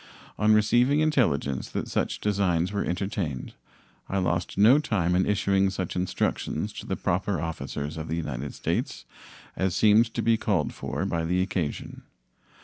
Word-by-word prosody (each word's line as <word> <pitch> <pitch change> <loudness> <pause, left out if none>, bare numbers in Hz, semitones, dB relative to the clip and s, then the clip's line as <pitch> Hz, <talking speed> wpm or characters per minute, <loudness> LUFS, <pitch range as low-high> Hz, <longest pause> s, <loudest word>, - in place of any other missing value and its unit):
On 105 0 +4
receiving 120 +7 +4
intelligence 100 - +1
that - - -3
such - - -1
designs 95 -4 +1
were 100 -1 -1
entertained, 90 - -3 0.6
I 100 - -1
lost 90 -2 -1
no 115 +8 +7
time 90 - 0
in 95 +1 +2
issuing 100 -1 +2
such 95 -2 -4
instructions 90 0 -2
to - - -9
the - - -1
proper 95 0 -1
officers 75 -1 -4
of 80 0 -5
the 80 - -2
United 70 -4 -4
States - - -2 0.5
as 95 -2 0
seemed 110 +2 +5
to - - -1
be 115 -1 +3
called 95 -9 0
for - - -3
by 85 -1 -1
the 90 +3 +1
occasion. 90 -6 -4
95 Hz, 155 wpm, -26 LUFS, 80-105 Hz, 0.6 s, no